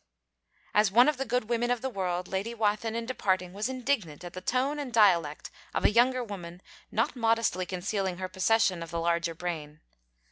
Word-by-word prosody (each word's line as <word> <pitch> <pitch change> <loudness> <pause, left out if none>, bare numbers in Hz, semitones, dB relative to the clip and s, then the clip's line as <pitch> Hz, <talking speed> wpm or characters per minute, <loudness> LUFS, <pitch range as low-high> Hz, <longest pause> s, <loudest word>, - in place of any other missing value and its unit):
As 210 -1 +4
one 240 +6 +6
of 300 -3 +2
the 270 - -2
good 245 -2 -1
women 240 +1 0
of 245 -2 0
the 265 - -2
world, 180 -3 -2
Lady 200 +5 -3
Wathin 220 0 0
in 230 0 -2
departing 185 -7 -1
was 210 +5 -2
indignant 245 - -2
at 175 - -8
the 185 - -7
tone 265 +8 0
and 280 -4 -4
dialect 175 -10 +3 0.2
of - - 0
a - - +6
younger 250 +3 +3
woman 180 -5 -8 0.3
not - - 0
modestly 225 -6 +1
concealing 190 0 -2
her 185 0 -3
possession 190 -1 +2
of 165 - -6
the 170 0 -3
larger 170 0 0
brain. 155 -3 -5
205 Hz, 190 wpm, -29 LUFS, 180-235 Hz, 0.3 s, one